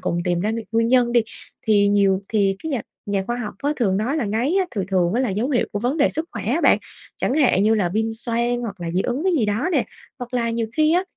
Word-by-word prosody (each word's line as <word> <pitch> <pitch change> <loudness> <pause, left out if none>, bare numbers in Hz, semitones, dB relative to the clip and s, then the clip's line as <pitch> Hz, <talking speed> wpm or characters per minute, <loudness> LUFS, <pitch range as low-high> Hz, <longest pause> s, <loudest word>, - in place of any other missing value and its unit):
cùng 170 - -1
tìm 175 -1 0
ra 210 +4 0
nguy 225 0 -3
nguyên 230 0 +2
nhân 245 -1 +3
đi. 240 - +5 0.5
Thì 205 -2 +4
nhiều 200 -2 +3
thì 200 -3 +1
cái 320 - -4
nhà 255 -7 -1 0.2
nhà 200 -1 0
khoa 240 - -2
học 225 -4 -5
á 290 - +1
thường 195 -6 +1
nói 235 +9 -1
là 295 - 0
ngáy 225 - 0
á 380 - +2
thường 205 -5 -2
thường 180 -1 +2
á 245 - +2
là 255 -5 0
dấu 215 +7 -1
hiệu 250 -4 +1
của 205 - -1
vấn 245 +7 -1
đề 285 - +4
sức 315 - -1
khỏe 220 - -5
á 255 +11 +1
bạn, - - +5 0.4
chẳng 255 - -1
hạn 260 -10 +3
như 220 +1 +4
là 200 -5 +1
viêm 220 +4 -1
xoang 235 +1 -1
hoặc 205 -5 -6
là 170 -1 -3
dị 180 +2 0
ứng 270 +7 -2
cái 380 - +2
gì 285 -10 +2
đó 215 - 0
nè, - - +2 0.3
hoặc 245 -1 -7
là 235 -2 0
nhiều 230 0 -1
khi 310 0 +4
á, 355 +2 +3
230 Hz, 285 wpm, -22 LUFS, 205-255 Hz, 0.5 s, đi